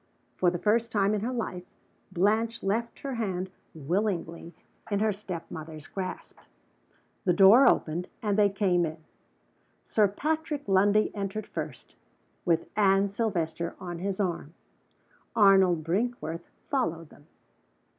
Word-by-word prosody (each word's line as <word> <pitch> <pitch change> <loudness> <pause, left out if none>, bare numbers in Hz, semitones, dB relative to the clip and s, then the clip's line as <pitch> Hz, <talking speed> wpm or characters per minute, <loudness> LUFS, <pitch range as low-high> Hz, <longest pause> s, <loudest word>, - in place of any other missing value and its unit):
For 180 - +3
the 175 - -2
first 225 +5 +1
time 205 -1 +2
in 210 - -1
her 235 +4 -2
life, 220 -7 -3 0.5
Blanche 220 +5 +1
left 225 +4 -2
her 275 -1 -4
hand 190 -5 -3 0.2
willingly 170 +1 -2 0.3
in 205 - +1
her 215 +1 +2
step 190 -4 -6
mother's 155 -1 -8
grasp. 185 +1 -6 0.8
The 180 - +3
door 210 +8 +8
opened, 170 +3 0
and 210 -2 0
they 205 -1 +4
came 190 -3 +1
in. 160 -1 -3 0.9
Sir 210 -2 +3
Patrick 300 +6 -2
Lundie 200 +2 +3
entered 200 +1 -3
first, - - -7 0.5
with 165 -2 +1
Anne 200 -1 +4
Silvester 170 -6 -2
on 175 -2 -6
his 195 +1 -3
arm. 175 -5 -2 0.8
Arnold 190 -5 +5
Brinkworth 175 -2 -2 0.2
followed 165 - -1
them. 145 - -19
195 Hz, 130 wpm, -28 LUFS, 175-215 Hz, 0.9 s, door